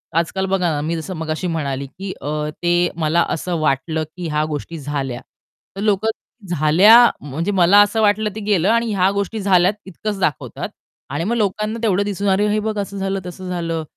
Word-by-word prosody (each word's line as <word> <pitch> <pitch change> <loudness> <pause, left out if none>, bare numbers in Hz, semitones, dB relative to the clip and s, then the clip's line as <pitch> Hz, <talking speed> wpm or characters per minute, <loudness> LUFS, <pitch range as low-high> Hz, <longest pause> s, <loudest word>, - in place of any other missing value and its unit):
आजकाल 170 +3 0
बघा 190 -2 +1
ना, 145 -1 -1
मी 165 +3 -2
जसं 165 +3 -5
मगाशी 160 +3 -3
म्हणाली 140 -5 -2
की 190 +7 -7
अ, 150 +1 -2
ते 175 0 +3
मला 170 +1 +2
असं 175 +2 -2
वाटलं 155 +2 0
की 175 -2 -4
ह्या 150 0 0
गोष्टी 155 +2 -5
झाल्या. 135 -3 -4 0.5
तर 195 - -5
लोकं 210 +1 +1 0.5
झाल्या 170 +9 +6 0.3
म्हणजे 155 +7 -3
मला 190 +1 +5
असं 205 +2 +2
वाटलं 210 0 +2
ते - - -4
गेलं 195 -2 +3
आणि 230 0 +2
ह्या 190 0 +3
गोष्टी 200 +2 -2
झाल्यात 185 -1 +4
इतकंच 195 +2 -5
दाखवतात. 155 -5 -2 0.4
आणि 145 +4 -2
मग 225 +6 0
लोकांना 215 +1 -1
तेवढं 200 -3 +2
दिसून, 200 0 -3
अरे 195 +2 +2
हे 210 +1 +1
बघ, 215 0 -3
असं 200 0 -4
झालं, 195 0 -1
तसं 180 +1 -7
झालं 165 -2 -2
180 Hz, 190 wpm, -20 LUFS, 160-205 Hz, 0.5 s, झाल्या